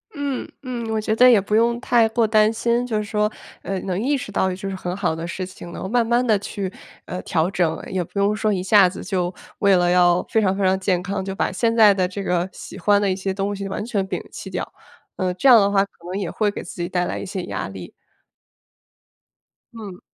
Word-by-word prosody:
嗯， 285 -2 -3
嗯， 240 -3 -4
我 220 0 0
觉 215 0 -1
得 250 +2 +7
也 235 -4 +6
不 200 +2 -4
用 235 +1 +3
太 235 -2 +3
过 230 +1 +2
担 215 0 +4
心， 235 +2 0
就 230 -3 -1
是 210 - -1
说， 210 +1 0 0.3
呃， 195 -1 -3
能 185 -1 -2
意 275 +6 +1
识 245 - -7
到 190 -1 +1
就 185 +1 -5
是 195 - -4
很 180 -1 -4
好 175 -5 0
的 165 +1 -5
事 185 +2 -4
情 185 -1 -11
啦。 170 - -9
然 - - -7
后 190 - -3
慢 235 +2 +2
慢 240 +2 +2
地 215 -4 +3
去， 195 -1 -5 0.3
呃， 180 - -5
调 165 +1 0
整， 170 -4 0
也 185 -2 -2
不 175 - -12
用 200 +1 +2
说 215 0 0
一 185 -3 -1
下 195 -1 +6
子 185 - -8
就 180 -2 -2 0.3
为 200 -1 +4
了 175 -1 +3
要 180 0 +4
非 220 - +2
常 195 -2 +1
非 200 - -1
常 190 0 +3
健 185 -2 0
康， 200 0 -3
就 195 0 -5
把 - - 0
现 230 +4 0
在 215 -3 +7
的 185 -2 0
这 195 +2 -6
个 180 -1 0
喜 - - -10
欢 205 +2 +3
的 205 -1 +1
一 185 - +1
些 195 0 -3
东 200 +1 -2
西 200 0 -5
完 195 +2 -4
全 205 -5 -1
摒 - - -3
弃 - - -8
掉， - - -5 0.4
呃， 185 -1 0
这 230 - +1
样 245 -3 +9
的 200 -1 +3
话 200 -1 +3
可 - - -28 0.2
能 190 - -2
也 190 -4 -3
会 210 -2 +1
给 205 - -6
自 175 - -8
己 175 - -2
带 180 -1 0
来 - - -3
一 - - -6
些 190 -1 -4
压 - - -4
力。 95 -2 -9 1.8
嗯。 205 -5 -9
200 Hz, 275 characters per minute, -22 LUFS, 185-220 Hz, 1.8 s, 样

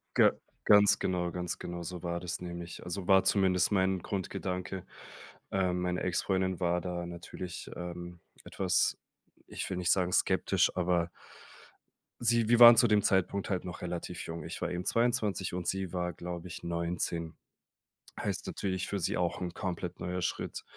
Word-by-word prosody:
G - - +6 0.3
ganz 105 -1 +6
genau 90 -1 -1
ganz 90 -1 -4
genau 85 0 -5
so 90 +1 -6
war 85 0 -2
das 90 0 -4
nämlich. 85 -1 -7
Also 90 +1 -5
war 95 -1 +6
zumindest 95 -2 +3
mein 95 -1 +2
Grundgedanke. 90 -1 -4 0.7
Ähm, 90 -2 +1
meine 90 0 -1
Ex-Freundin 95 0 0
war 90 -1 +1
da 90 -1 -4
natürlich, 85 +1 -7
ähm, 85 0 -7 0.3
etwas 95 -2 +1 0.5
ich - - -5
will 95 - -3
nicht 90 -1 +2
sagen, 90 -2 +2
skeptisch, - - +2
aber 90 -2 +1 1.1
sie 115 -1 +3
wir 120 +1 +4
waren 120 -1 +11
zu 120 +1 +6
dem 105 -1 +4
Zeitpunkt 95 0 +1
halt 95 -2 -1
noch 90 - -7
relativ 90 0 -4
jung. 85 -1 -6
Ich - - -6
war - - -1
eben 90 +1 -3
22 110 -6 +1
und 90 -1 -3
sie 95 -2 -1
war, 90 -1 -2
glaube 90 0 -6
ich, 85 - -8
19. 85 -1 -2 0.8
Heißt - - -3
natürlich 95 -2 -2
für 100 - -2
sie 85 - 0
auch 90 0 -1
'n 90 -2 -3
komplett 90 -2 -4
neuer 90 +1 -3
Schritt. - - -3
90 Hz, 165 wpm, -31 LUFS, 85-95 Hz, 1.1 s, waren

